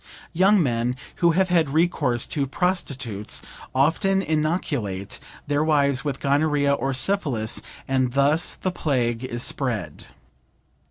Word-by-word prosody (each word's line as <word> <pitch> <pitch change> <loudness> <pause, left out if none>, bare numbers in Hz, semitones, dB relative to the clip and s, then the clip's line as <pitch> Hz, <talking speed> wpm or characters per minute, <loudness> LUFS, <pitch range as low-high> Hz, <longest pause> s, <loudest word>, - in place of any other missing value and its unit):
Young 190 +2 +4
men 120 -1 0 0.2
who 170 -2 +3
have 190 -1 +3
had 165 -4 +3
recourse 145 -6 +1
to 140 -2 -2
prostitutes, 135 - -2 0.4
often 190 +8 +2
inoculate 150 - -2 0.3
their 145 0 +1
wives 140 -4 +2
with 140 -3 -3
gonorrhea 145 0 +2
or 135 -1 -1
syphilis, 130 - 0 0.3
and 130 -2 +1
thus 145 +5 +2
the 185 - -2
plague 125 -8 -1
is 120 -1 -3
spread. 105 - -3
140 Hz, 120 wpm, -24 LUFS, 125-165 Hz, 0.4 s, Young